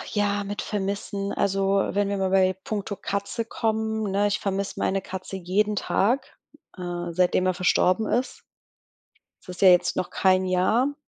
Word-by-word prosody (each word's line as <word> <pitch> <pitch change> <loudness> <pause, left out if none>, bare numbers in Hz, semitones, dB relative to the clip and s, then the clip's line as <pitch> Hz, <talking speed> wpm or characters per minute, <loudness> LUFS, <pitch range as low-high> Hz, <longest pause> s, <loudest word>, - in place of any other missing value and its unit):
Ach - - -7
ja, 205 -1 0
mit 205 +1 -4
Vermissen. 200 0 -3
Also, 195 0 +1
wenn 205 0 +1
wir 200 - -1
mal 190 -1 0
bei 190 -1 +4
puncto 205 -1 -3
Katze 200 +3 -3
kommen, 220 -2 -1
ne? 200 +1 +2
Ich 205 - 0
vermiss 195 0 -2
meine 195 0 0
Katze 190 +1 -6
jeden 205 +3 0
Tag, 250 +9 0 0.4
äh, 175 -1 -4
seitdem 180 +1 +2
er 185 - +2
verstorben 185 +3 +2
ist. 245 +3 -1 1.0
Es - - -18
ist 180 - -8
ja 190 - +8
jetzt 180 -1 +4
noch 185 - -2
kein 185 0 +3
Jahr, 215 +10 +2
195 Hz, 170 wpm, -25 LUFS, 185-205 Hz, 1.0 s, ja